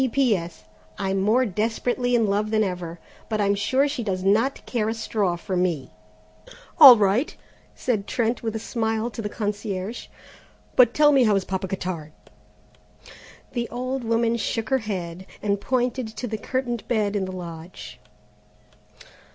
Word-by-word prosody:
"P.P.S. 215 - 0 0.3
I'm 195 -1 -1
more 230 +6 +3
desperately 235 +4 0
in 230 -2 +3
love 205 +1 0
than 215 0 +2
ever, 175 -3 -4 0.3
but 215 -1 -1
I'm 200 -1 +3
sure 260 +8 +1
she 280 -3 -3
does 185 -3 -2
not 220 +8 +1
care 220 -3 -1
a 225 - -2
straw 210 -5 -1
for 185 +2 -4
me." 170 -7 -1 0.9
"All 270 -6 +12
right," 210 +8 +1 0.4
said 215 -6 -1
Trent, 235 0 0
with 225 -1 -3
a 220 - -5
smile, 225 0 -1
to 230 - -6
the 210 - -3
concierge; 205 0 -4 0.7
"but 245 -2 +5
tell 295 0 +6
me, 270 -3 +5
how 210 -2 +4
is 195 - 0
Papa 190 0 -3
Cottard?" 180 -5 -5 1.4
The 240 -2 -3
old 255 +1 -3
woman 230 0 +1
shook 225 -1 -2
her 265 0 +3
head 190 -4 -5
and 200 -1 -1
pointed 250 0 0
to 220 +3 -6
the 220 -2 -4
curtained 245 -2 -3
bed 215 -4 0
in 195 -2 0
the 185 - -6
lodge. 170 -1 -9
215 Hz, 160 wpm, -24 LUFS, 190-240 Hz, 1.4 s, All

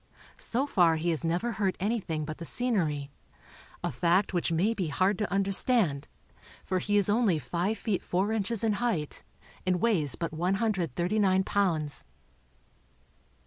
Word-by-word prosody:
So 255 +4 0
far 175 - +3
he 170 +2 -1
has 160 - +1
never 175 +9 -1
hurt 200 -4 -1
anything 190 -7 -2
but 155 0 -7
the - - -6
scenery, 165 - 0 0.7
a - - -1
fact 180 +3 +1
which 175 -1 0
may 185 +8 +2
be 190 -6 -2
hard 185 +7 +1
to 210 - -2
understand, 195 - +2 0.6
for 185 0 0
he 205 +3 0
is 200 - +3
only 210 -5 +2
five 175 - -2
feet 200 -2 -2
four 190 +4 -1
inches 220 0 -1
in 220 -2 +2
height 190 -12 -2 0.4
and 185 -1 +1
weighs 170 - +2
but 165 -1 -4
139 190 - 0
pounds. 165 -8 +1
185 Hz, 145 wpm, -28 LUFS, 165-210 Hz, 0.7 s, far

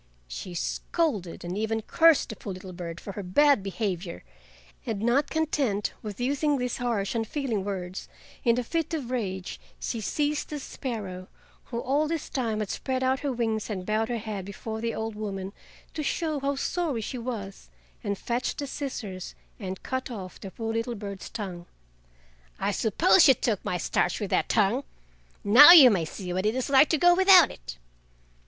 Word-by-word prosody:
She 120 - -7
scolded 205 - -2
and 175 +1 -4
even 220 +1 -1
cursed 330 +3 +4
the 220 - -5
poor 195 - -6
little 185 0 -9
bird 170 -1 -6
for 200 - -7
her 205 - -6
bad 275 +7 +4
behavior, 190 -3 -4 0.6
and 225 -5 -3
not 240 +7 +2
content 280 -10 0
with 210 -3 -7
using 285 +3 +1
these 250 -1 -2
harsh, 230 -5 -1
unfeeling 230 -2 -2
words, 185 -2 -5 0.3
in 235 -1 +3
a 250 - 0
fit 325 +5 -2
of 260 -6 -5
rage 190 -7 -3 0.2
she 230 - -3
seized 295 +8 -1
the 300 - -4
sparrow—who 220 -2 -7
all 285 +5 +1
this 325 -1 -3
time 225 -5 -1
had 210 - -3
spread 260 -1 -2
out 260 +1 +2
her 285 - -2
wings 225 -3 -2
and 185 -4 -4
bowed 215 +2 0
her 240 - -1
head 215 -3 -5
before 220 +3 -6
the 230 0 -2
old 220 0 -3
woman, 200 -2 -5 0.4
to 310 - -3
show 310 0 -1
how 280 +1 -1
sorry 290 -3 -1
she 245 +4 -5
was—and 195 - -7
fetched 240 +4 -2
the 285 - -3
scissors 225 -10 -6 0.2
and 190 -3 -6
cut 260 0 -3
off 190 -7 -8
the 195 - -7
poor 225 +3 -4
little 230 +1 -2
bird's 200 -2 -7
tongue. 185 -6 -6 0.9
"I - - 0
suppose - - +4
you - - +7
took - - -1
my - - -1
starch - - 0
with - - -4
that - - +1
tongue! - - +2 0.6
Now 270 +11 +10
you 275 -8 +10
may 175 -6 +1
see 180 +3 -6
what 185 +3 0
it 220 - 0
is 260 +1 -2
like 275 +2 +6
to 320 - +2
go 350 +4 +6
without 380 +1 +7
it!" - - -9
225 Hz, 180 wpm, -27 LUFS, 195-270 Hz, 0.9 s, Now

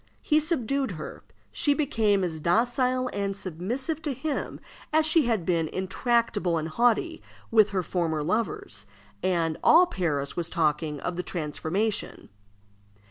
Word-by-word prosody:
He 305 -1 +3
subdued 275 - -1
her. 155 -2 -8 0.3
She 290 -4 +2
became 220 -9 +1
as 165 -3 -3
docile 250 - +1
and 200 -1 -2
submissive 235 - -3
to 290 -4 -3
him 305 +3 -3 0.3
as 310 0 +3
she 315 -4 +4
had 220 -8 0
been 165 -3 +1
intractable 195 -1 0
and 160 0 -3
haughty 245 - +1 0.3
with 215 -2 +5
her 190 -2 -1
former 160 -3 -1
lovers, 155 - -2 0.3
and 165 -4 0
all 345 +3 +7
Paris 155 - -2
was 170 -1 -1
talking 150 -2 0
of 180 - -3
the - - 0
transformation. 180 +6 -2
200 Hz, 135 wpm, -26 LUFS, 165-255 Hz, 0.3 s, all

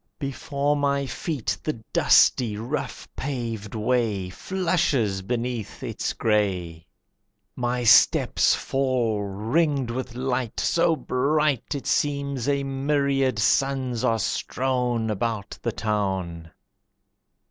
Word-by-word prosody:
Before 140 0 -1
my 140 -1 +1
feet 140 -2 -3
the 155 - -2 0.2
dusty, 110 -5 +4
rough 120 +8 -4
paved 115 -6 -4
way 110 -5 0
Flushes 155 - 0
beneath 120 +1 -4
its - - -3
gray. 90 -7 -1 0.7
My 125 0 -1
steps 115 - +5
fall 125 -6 0
ringed 120 +7 0
with 125 0 -5
light, 125 -2 -2
So 165 -1 +2
bright, 150 0 0
It 140 - -5
seems 140 -3 0
a 140 -1 +1
myriad 135 -2 0
suns 130 +1 +1
are 115 -3 +2
strown 125 +1 -1
About 105 -1 -3
the 115 - -1
town. 95 -7 -2
125 Hz, 105 wpm, -25 LUFS, 110-140 Hz, 0.7 s, steps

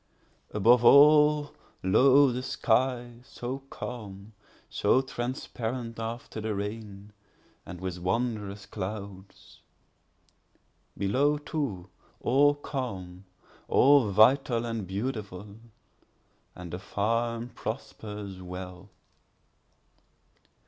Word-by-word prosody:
Above 115 +4 +4
all, 150 +3 +6 0.3
lo, 135 +8 +5
the 125 +1 -3
sky, 120 -1 0
so 130 +1 -6
calm, 105 -3 -8 0.3
so - - +2
transparent 120 -2 -4
after 115 0 -5
the 110 -1 -2
rain, 105 0 -6 0.5
and 90 - -8
with 90 -1 -5
wondrous 105 0 -2
clouds; 100 -1 -8 1.4
Below, 135 +10 +2
too, 140 - -4 0.3
all 145 +2 +3
calm, 95 -11 -6 0.4
all 135 -4 +5
vital 120 +4 +4
and 115 -4 -4
beautiful—and 105 -1 -5 1.1
the 90 - -4
farm 115 +4 -1
prospers 105 -5 -7
well. 90 +1 -8
115 Hz, 80 wpm, -28 LUFS, 100-130 Hz, 1.4 s, all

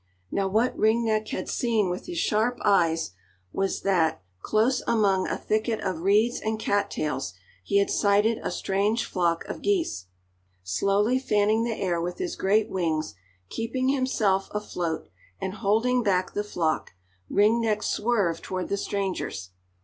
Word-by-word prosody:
Now 195 -1 0
what 220 +6 +1
Ring 225 +2 +2
Neck 215 -1 0
had - - -4
seen 225 -5 +1
with 180 +1 -4
his 350 -1 -5
sharp 240 -4 +1
eyes 165 - +3 0.4
was 195 0 -1
that, 170 - +1 0.2
close 230 - +2
among 200 -5 +2
a - - -2
thicket 220 +1 -1
of 185 -4 -2
reeds 210 +6 +3
and 220 0 -2
cat 205 -1 0
tails, 135 - -3 0.3
he 200 - +1
had 200 - +2
sighted 205 +2 +3
a - - -2
strange 200 +6 0
flock 170 -3 0
of - - -6
geese. 335 - 0 0.6
Slowly 200 - +1
fanning 215 -2 +2
the 230 -2 -3
air 175 -3 0
with 175 +1 -3
his 360 -2 -3
great 210 +3 +2
wings, 160 - -1 0.4
keeping 255 +3 -1
himself 225 -8 +1
afloat, 175 - -3 0.3
and 190 - -3
holding 225 +4 +2
back 185 -4 +1
the 205 - -1
flock, 165 - -1 0.4
Ring 215 +3 +3
Neck 215 -2 0
swerved 205 -8 0
toward 185 -1 -4
the 200 - 0
strangers. 190 - -3
205 Hz, 155 wpm, -26 LUFS, 185-225 Hz, 0.6 s, eyes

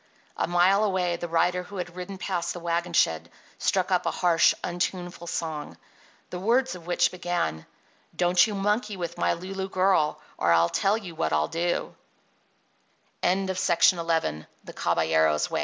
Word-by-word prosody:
A - - -1
mile 180 +4 +4
away 185 -4 0
the 175 - -5
rider 175 +2 +1
who 195 +2 -10
had 175 -1 -5
ridden 185 +2 -6
past 185 -3 -2
the 175 - -7
wagon 170 +1 -2
shed 80 - +2 0.3
struck - - 0
up - - +1
a - - +2
harsh, 170 -2 +3
untuneful 175 0 -3
song, 160 -3 -4 0.5
the 180 - -4
words 245 +7 +2
of 175 -2 -11
which 175 0 +2
began: 175 - -3 0.5
Don't 175 +2 +4
you 210 - -4
monkey 210 +1 -1
with 170 -1 -5
my - - +2
Lulu 190 +2 -5
girl 185 -6 +2 0.2
Or 85 - +2
I'll 85 0 +4
tell 200 +2 +1
you 190 -6 -8
what 80 - -1
I'll 75 0 +2
do— 175 +1 -1 1.3
XII 190 +1 +1
T - - -11
175 Hz, 150 wpm, -26 LUFS, 170-190 Hz, 1.3 s, mile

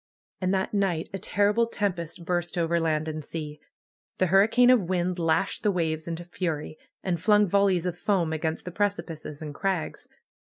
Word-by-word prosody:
And 185 0 +1
that 190 +1 0
night 190 -6 0
a 195 - -3
terrible 205 +5 +2
tempest 175 -6 -3
burst 175 +1 -1
over 170 0 +1
land 155 -1 0
and 155 -1 -4
sea. 150 -1 -6 0.6
The 185 - +3
hurricane 225 +6 +6
of 210 -9 +3
wind 180 0 0
lashed 165 +4 +1
the 210 - +2
waves 160 -4 -1
into 170 +1 -4
fury, 165 -4 -4 0.2
and 175 -4 -1
flung 210 +1 +5
volleys 195 -2 +2
of 180 -2 -1
foam 175 -3 0
against 160 0 -2
the 180 - -5
precipices 165 -6 -3
and 150 -1 -6
crags. 190 +1 -2
175 Hz, 170 wpm, -27 LUFS, 160-195 Hz, 0.6 s, hurricane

